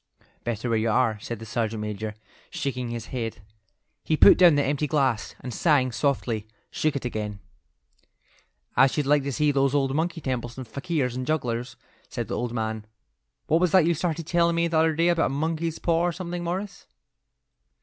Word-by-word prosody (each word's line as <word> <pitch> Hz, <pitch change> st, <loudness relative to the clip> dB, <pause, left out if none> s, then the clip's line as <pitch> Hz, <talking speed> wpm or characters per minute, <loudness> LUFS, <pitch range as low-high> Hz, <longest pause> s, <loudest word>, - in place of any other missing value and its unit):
"Better 120 Hz, 0 st, -3 dB
where 115 Hz, -2 st, +1 dB
you 115 Hz, +1 st, 0 dB
are," 110 Hz, -2 st, +2 dB
said 120 Hz, +2 st, -5 dB
the 115 Hz, -, -9 dB
sergeant 110 Hz, 0 st, -2 dB
major, 105 Hz, 0 st, -4 dB, 0.3 s
shaking 125 Hz, -3 st, -3 dB
his 115 Hz, -1 st, -5 dB
head. 115 Hz, -5 st, -4 dB, 0.6 s
He 155 Hz, -, +1 dB
put -, -, +8 dB
down 175 Hz, -4 st, +7 dB
the 145 Hz, -, +2 dB
empty 145 Hz, +2 st, 0 dB
glass, 135 Hz, -7 st, 0 dB
and 125 Hz, -1 st, -6 dB
sighing 140 Hz, -5 st, +2 dB
softly, 115 Hz, -3 st, -1 dB, 0.2 s
shook 155 Hz, -2 st, 0 dB
it 135 Hz, -, -3 dB
again. 105 Hz, -4 st, -3 dB, 1.4 s
"I 135 Hz, +2 st, +6 dB
should 145 Hz, +2 st, -1 dB
like 145 Hz, +1 st, +4 dB
to 140 Hz, +1 st, -3 dB
see 150 Hz, +2 st, +2 dB
those 140 Hz, 0 st, +2 dB
old 135 Hz, -2 st, +2 dB, 0.3 s
temples 120 Hz, -2 st, -3 dB
and 130 Hz, -2 st, -7 dB
fakirs 140 Hz, 0 st, -2 dB
and 130 Hz, 0 st, -4 dB
jugglers," 125 Hz, -6 st, -2 dB, 0.3 s
said -, -, -4 dB
the -, -, -2 dB
old 120 Hz, -1 st, -2 dB
man. 110 Hz, -2 st, -3 dB, 0.6 s
"What 160 Hz, +2 st, +2 dB
was 180 Hz, -3 st, +3 dB
that 185 Hz, -4 st, +6 dB
you 170 Hz, -, +3 dB
started 165 Hz, 0 st, -2 dB
telling 170 Hz, 0 st, +2 dB
me 170 Hz, 0 st, +2 dB
the 165 Hz, -1 st, +1 dB
other 160 Hz, 0 st, +3 dB
day 170 Hz, +2 st, +3 dB
about 170 Hz, -1 st, +2 dB
a -, -, -3 dB
monkey's 160 Hz, +3 st, -2 dB
paw 170 Hz, 0 st, +1 dB
or -, -, +1 dB
something, 175 Hz, 0 st, -5 dB
Morris?" 185 Hz, +4 st, -4 dB
135 Hz, 190 wpm, -25 LUFS, 115-160 Hz, 1.4 s, put